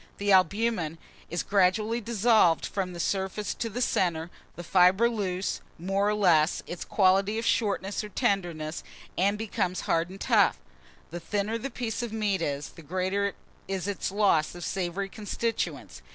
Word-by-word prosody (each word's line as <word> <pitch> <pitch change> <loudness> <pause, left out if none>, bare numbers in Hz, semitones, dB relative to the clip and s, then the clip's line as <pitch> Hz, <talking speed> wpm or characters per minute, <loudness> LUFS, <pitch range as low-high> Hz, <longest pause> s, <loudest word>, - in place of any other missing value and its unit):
The 205 0 0
albumen 190 -2 +2 0.3
is 175 +1 -2
gradually 210 +4 +2
dissolved 220 -6 +3
from 190 -3 -3
the 175 - -8
surface 190 +3 -1
to 230 - -3
the 245 +4 -2
centre; 170 -5 0 0.2
the 175 - -7
fibre 185 +6 +5
loses, 195 -5 -2 0.2
more 195 +4 0
or 210 - +1
less, 175 -6 +3
its 175 - -6
quality 195 +2 +2
of 225 - -2
shortness 200 -3 0
or 210 - -7
tenderness, 175 -9 -1 0.3
and 200 +3 +2
becomes 190 -4 -2
hard 165 +1 0
and 190 +1 -10
tough: - - +3 0.5
the 175 - -5
thinner 210 +5 -2
the 275 - -4
piece 235 -3 -3
of 240 -2 -4
meat 210 -4 0
is, 145 -2 -2
the - - -14
greater 185 +5 -1 0.3
is 195 0 -3
its 200 -2 -2
loss 195 -7 +2
of 175 - -7
savoury 190 +1 -2
constituents. 225 +3 -3
195 Hz, 160 wpm, -28 LUFS, 175-210 Hz, 0.5 s, fibre